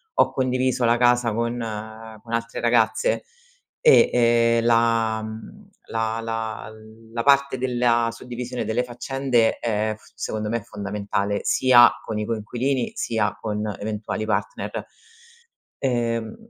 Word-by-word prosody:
ho - - +3
condiviso 130 -1 0
la 120 0 +4
casa 120 -1 +3
con 115 +1 -1 0.7
con 115 - -9
altre 115 0 -2
ragazze 120 - +2 0.6
e, 465 -2 +6 0.5
ehm, - - -4
la 115 -1 +2
mhmm, 110 - -9 0.2
la 115 0 -1
la 115 -1 -4 0.4
la 115 - -2
parte 140 -1 +3
della 120 -2 +1
suddivisione 125 +1 -6
delle 110 +3 0
faccende, 125 -1 0
è 110 -1 -1
f - - -21
secondo 105 -1 -4
me 115 - 0
è 115 - -6
fondamentale, 100 -1 -3
sia 120 -2 +6 0.2
con 110 -1 -3
i 105 - -2
coinquilini, 120 +4 -2
sia 110 -3 -1
con 105 -1 -2
eventuali 105 +1 -4
partner. - - -3 0.9
Ehm, 115 -3 -1
115 Hz, 125 wpm, -23 LUFS, 110-125 Hz, 0.9 s, e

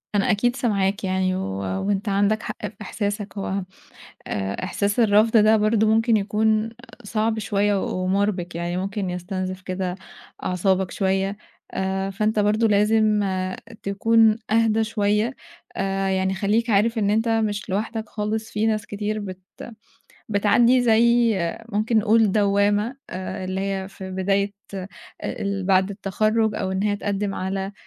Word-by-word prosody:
أنا 200 - +3
أكيد 240 +4 +1
سامعاك 200 -5 0
يعني 185 0 0
و 190 - -2 0.5
وأنت 200 +1 0
عندك 205 +3 +1
حق - - -5
في - - -4
إحساسك، 205 0 -4
هو 195 - -3 0.8
آآ 100 - -3
إحساس 200 +4 -1
الرفض 220 +1 +4
ده 215 +1 +6
برضه 215 +1 +2
ممكن 225 +1 +3
يكون 215 +2 +1 0.3
صعب 220 +1 -1
شوية 205 -1 +1
و 185 - -2
ومُربِك، 185 -2 0
يعني 175 +1 -2
ممكن 195 0 -2
يستنزف 185 +1 -4
كده 185 -1 -3 0.5
أعصابك 185 0 +1
شوية، 195 +1 0 0.3
آآ 190 0 -2
فأنت 215 +2 0
برضه 215 +2 +3
لازم 210 0 +3 0.6
تكون 220 +2 +3
أهدى 225 0 +3
شوية، 215 +3 0 0.4
آآ 195 0 -1
يعني 190 0 +1
خلّيك 215 +4 0
عارف 225 +3 +2
إن 205 -2 +1
أنت 225 +2 +1
مش 215 -3 0
لوحدك 220 +2 -3
خالِص 220 +1 -3
في 210 +1 0
ناس 215 -1 0
كتير 210 +1 -3
بت 190 -2 -7 0.9
بتعدّي 230 +4 +4
زي 235 0 +4 0.3
ممكن 220 +1 +1
نقول 215 -1 +3
دوّامة 205 +3 +2
آآ 185 0 -5
اللي 185 +1 -3
هي 195 -1 -2
في 190 -1 -9
بداية 200 +2 0 0.2
آآ 190 0 -5 0.3
ال 200 -5 -3
بعد 190 0 +3
التخرُّج 215 +3 0
أو 190 - -2
إن 190 +1 -1
هي 205 -1 +1
تقدِّم 200 0 -2
على 190 +1 -3
205 Hz, 145 wpm, -23 LUFS, 190-220 Hz, 0.9 s, ده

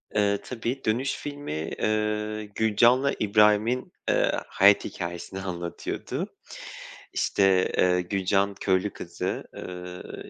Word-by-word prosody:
Eee, 100 -1 +3
tabii, 125 +2 -4
"Dönüş" 125 +6 +1
filmi, 145 - -5
ııı, 105 0 0
Gülcan'la 115 +6 +3
İbrahim'in, 105 +4 +3 0.2
ııı, - - +2
hayat 100 +1 +5
hikâyesini 85 +2 -5
anlatıyordu. 85 -2 -4 0.8
İşte, 95 -2 +3
eee, 90 0 +4
Gülcan 100 +2 +1
köylü 95 +1 0
kızı, - - -4
ııı, 90 0 -8
105 Hz, 100 wpm, -26 LUFS, 95-110 Hz, 0.8 s, hayat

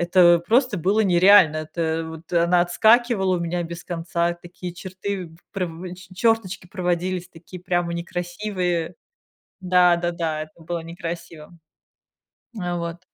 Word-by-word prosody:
о, 175 -2 +7
просто 225 +5 +2
было 195 +6 +1
нереально. 185 -3 +6
Это 160 +1 -2
вот 160 +1 -11
она 170 +1 +4
отскакивала 210 +1 +3
у - - -4
меня 175 +1 -2
без 170 +1 -7
конца. 170 0 -1
Такие 175 0 -9
черты, 185 -1 -5 0.2
прям, 180 -2 -4
че 185 0 -14
чёрточки 225 -5 0
проводились, 180 -1 -2
такие 175 +2 -12
прямо 175 -1 -1
некрасивые 175 0 -3 0.7
Да 180 -1 +5
да-да, 170 -3 -2
это 155 +2 -18
было 170 +1 -3
некрасиво. 165 -1 -8 1.0
Э, 175 -1 -2
вот. 170 +1 -6
175 Hz, 125 wpm, -23 LUFS, 170-185 Hz, 1.0 s, о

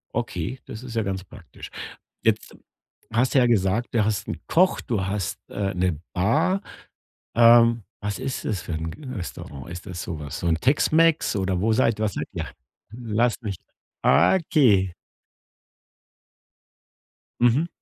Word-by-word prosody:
Okay, 130 - -3
das 110 - -8
ist 125 -2 -8
ja 115 - +1
ganz 95 -1 -3
praktisch. - - -12 0.5
Jetzt - - 0 0.6
hast 120 +5 +1
du 135 - +7
ja 125 - +4
gesagt, 105 0 +1
du 110 -3 +3
hast 105 -2 -1
'n - - -4
Koch, 185 +2 +3
du 105 -6 -2
hast 95 -1 -2
äh, 100 -1 -2
'ne 90 -3 0
Bar. 155 - +2 0.7
Ähm, 115 -1 +6 0.2
was 105 -1 -3
ist 130 0 -4
das 100 -6 -1
für - - -7
'n 80 +1 -3
g 150 - -12
Restaurant? 75 - -7
Ist 90 0 -8
das 90 -2 -5
so 85 -3 -5
was 70 -2 -6
so 85 - -2
'n 80 - +3
Tex-Mex 155 - +3
oder 95 -2 0
wo 110 +2 +2
seid 115 -2 +2
was 110 -3 0
seid - - -4
ihr? - - -4 0.4
Lass 115 +1 0
mich 100 -5 -4 0.5
okay. 100 - +4 2.5
Mhm. 120 +7 +3
110 Hz, 150 wpm, -24 LUFS, 95-125 Hz, 2.5 s, du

